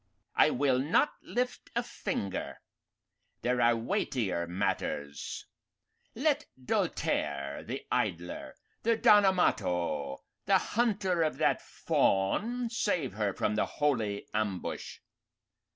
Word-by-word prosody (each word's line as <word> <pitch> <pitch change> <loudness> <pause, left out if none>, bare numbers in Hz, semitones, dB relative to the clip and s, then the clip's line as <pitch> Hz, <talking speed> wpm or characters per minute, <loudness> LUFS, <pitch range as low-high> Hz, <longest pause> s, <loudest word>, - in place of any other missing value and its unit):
"I - - +6
will 130 -1 +2
not 160 - +2
lift 250 +1 -3
a 235 - +1
finger. 180 - -3 0.9
There 125 0 +1
are 120 0 +5
weightier 115 - -1
matters. 75 -5 -2 0.7
Let - - +1
Doltaire, 70 - -1
the - - -5
idler, 85 +1 -2 0.3
the 230 0 +2
Don 210 -2 +6
Amato, 90 - 0 0.2
the - - +6
hunter 195 -6 +1
of 155 -1 +1
that - - +2
fawn, 225 - +1
save 180 - 0
her 105 -1 0
from 105 - -1
the 105 - +1
holy 115 -9 0
ambush. 105 -4 -3
120 Hz, 105 wpm, -30 LUFS, -, 0.9 s, I